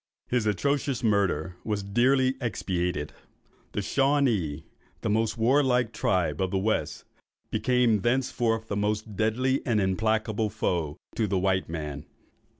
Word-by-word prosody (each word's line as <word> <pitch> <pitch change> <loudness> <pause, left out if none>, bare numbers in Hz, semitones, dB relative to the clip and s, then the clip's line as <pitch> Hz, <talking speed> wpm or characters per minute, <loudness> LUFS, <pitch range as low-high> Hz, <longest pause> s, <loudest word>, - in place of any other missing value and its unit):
His 120 -3 +1
atrocious 135 +4 0
murder 95 -6 +1
was 105 -2 -2
dearly 130 +6 +3
expiated. 90 -9 -2 0.6
The 105 - -1
Shawanees, 115 - +1 0.4
the 110 - -1
most 110 +1 +1
warlike 125 -1 +3
tribe 90 -7 0
of 95 - +1
the 95 - -1
West, 110 +3 -1 0.5
became 125 -4 +2
thenceforward 120 -2 0
the 100 - -3
most 105 +1 -1
deadly 125 +6 +1
and 115 -5 +1
implacable 110 +2 0
foes 85 -7 -2 0.2
to 110 - 0
the 95 -1 0
white 95 -1 +1
man. 75 -3 -5
110 Hz, 130 wpm, -27 LUFS, 95-120 Hz, 0.6 s, dearly